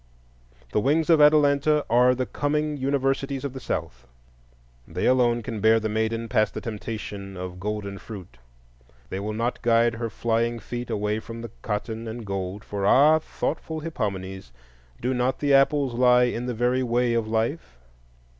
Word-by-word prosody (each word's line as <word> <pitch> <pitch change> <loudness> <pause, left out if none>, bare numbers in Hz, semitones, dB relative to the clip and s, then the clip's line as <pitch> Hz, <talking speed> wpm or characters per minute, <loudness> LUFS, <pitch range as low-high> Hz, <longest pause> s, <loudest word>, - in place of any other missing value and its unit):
The - - +2
Wings 150 +8 +2
of 160 -2 +6
Atalanta 150 0 +4
are 125 +2 +4
the 130 0 -1
coming 150 +6 -1
universities 135 0 -1
of 140 - -4
the 135 - -6
South. 60 - -5 0.8
They - - -3
alone 120 -2 +3
can 115 -3 -5
bear 110 +2 +5
the 110 0 -2
maiden 110 +1 -1
past 110 0 +1
the - - -4
temptation 105 -4 -6
of 90 0 -6
golden 100 0 -4
fruit. 90 - -10 0.7
They 95 - -3
will 105 +2 -3
not 115 +3 -2
guide 115 0 +3
her 115 0 -3
flying 115 +2 0
feet 120 +2 -6
away 105 +1 -1
from 115 +1 -8
the 115 - -7
cotton 110 +1 -4
and 110 0 -6
gold; 95 0 -4
for—ah, 135 +10 +4
thoughtful 155 0 -4
Hippomenes!—do 95 - -5
not 125 +1 0
the 145 -1 +1
apples 135 -1 +3
lie 125 0 +5
in 125 0 -1
the 125 - -2
very 125 +3 +1
Way 120 -1 +1
of 115 -2 0
Life? 110 - -2
115 Hz, 160 wpm, -25 LUFS, 105-130 Hz, 0.8 s, of